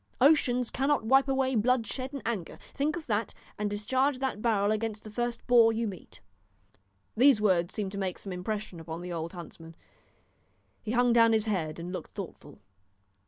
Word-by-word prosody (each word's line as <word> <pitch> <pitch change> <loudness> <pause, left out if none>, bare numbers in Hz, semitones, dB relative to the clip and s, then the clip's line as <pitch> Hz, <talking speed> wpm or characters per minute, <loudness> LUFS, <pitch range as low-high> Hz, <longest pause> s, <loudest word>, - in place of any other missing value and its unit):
Oceans 250 -3 +3
cannot 270 -2 +1
wipe 270 +4 +4
away 265 -1 +1
blood 240 +1 +2
shed 260 +5 -4
in 280 -2 -7
anger. 215 -7 -3 0.2
Think 295 +2 0
of 335 -3 -6
that, 215 -2 -1 0.2
and 210 0 0
discharge 255 +7 0
that 260 -5 -3
barrel 210 -3 +2
against 215 -1 -2
the 215 - -10
first 240 +1 -3
boar 235 -2 +6
you 225 +1 -1
meet." 190 -4 -10 0.9
These 255 0 +6
words 180 -5 +1
seemed 200 -3 -2
to 200 - -5
make 185 -2 -2
some 195 - -7
impression 200 0 -4
upon 165 +1 -7
the 180 0 -5
old 165 +1 -4
huntsman; 165 -2 -10 1.1
he 220 - -4
hung 245 -1 +3
down 230 -1 +5
his 220 -1 +2
head 170 -8 -2
and 175 +2 -6
looked - - -6
thoughtful. 170 -7 -9
220 Hz, 180 wpm, -29 LUFS, 190-250 Hz, 1.1 s, boar